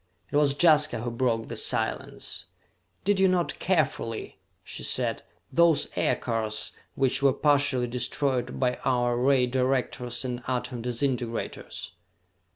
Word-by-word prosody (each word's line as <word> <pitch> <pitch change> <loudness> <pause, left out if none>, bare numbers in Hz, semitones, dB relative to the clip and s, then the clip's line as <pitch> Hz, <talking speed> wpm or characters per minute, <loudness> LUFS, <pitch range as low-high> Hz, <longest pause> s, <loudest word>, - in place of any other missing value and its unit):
It - - -3
was 145 -1 +3
Jaska 155 -7 +4
who 120 +1 -3
broke 115 -2 0
the - - -6
silence. - - -1 0.6
"Did 200 0 +2
you 190 - +5
note 180 -2 0
carefully," 155 - -1 0.2
she - - -5
said, - - 0 0.3
"those 170 -1 +4
aircars 110 -2 -1 0.2
which 135 0 +1
were 140 -1 +4
partially 145 -3 +2
destroyed 125 +1 -1
by 125 -1 +1
our 120 -1 +1
ray 130 +1 +3
directors 125 -1 -1
and 125 -1 -3
atom 125 -1 -2
disintegrators?" 120 -1 -3
130 Hz, 125 wpm, -27 LUFS, 120-145 Hz, 0.6 s, you